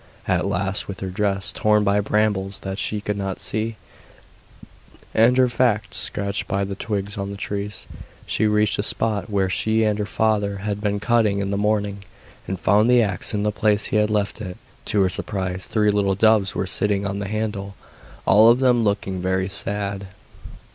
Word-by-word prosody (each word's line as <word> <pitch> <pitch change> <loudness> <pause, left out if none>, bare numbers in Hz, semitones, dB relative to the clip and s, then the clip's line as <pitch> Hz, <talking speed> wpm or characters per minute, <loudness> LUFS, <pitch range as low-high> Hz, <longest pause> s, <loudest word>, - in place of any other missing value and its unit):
At - - +1
last, 95 +2 -1
with 100 - -7
her 95 -1 -4
dress 100 0 0
torn 105 -1 +2
by 100 0 +2
brambles 100 -2 0
that 95 +1 -5
she 105 -1 -1
could 105 0 -3
not 95 -1 -3
see, 110 +1 -2 1.4
and 115 +3 +4
her 130 -1 +5
fact 120 -3 0
scratched 100 0 -2
by 100 0 0
the 100 0 -4
twigs 100 0 -4
on 100 0 -3
the 100 - -6
trees, 100 +1 -4 0.4
she 110 - +1
reached 105 0 +2
the - - +1
spot 110 0 -1
where 100 -2 +1
she 110 +4 +1
and 105 -1 +1
her 105 - -2
father 105 -2 0
had 105 -1 -2
been 105 -1 -1
cutting 110 -2 +2
in 100 0 -2
the - - 0
morning, 105 -1 0 0.5
and 95 -1 -3
found 105 +5 +3
the 125 -1 +5
axe 100 +1 -1
in 100 - -1
the 105 - +1
place 105 0 +1
he - - +1
had 105 0 +2
left 105 +1 -1
it. 90 -4 -6 0.3
To 105 - +1
her 95 - +3
surprise, 95 -1 -3
three 105 -2 +2
little 100 -1 +1
doves 110 -1 +3
were - - -1
sitting 100 +1 +1
on 100 0 -3
the 100 - -4
handle, 105 -2 -3 0.5
all 110 +3 +7
of 120 - +5
them 125 -3 +3
looking 100 -3 -1
very 95 0 0
sad. 100 0 -4
100 Hz, 190 wpm, -22 LUFS, 100-110 Hz, 1.4 s, all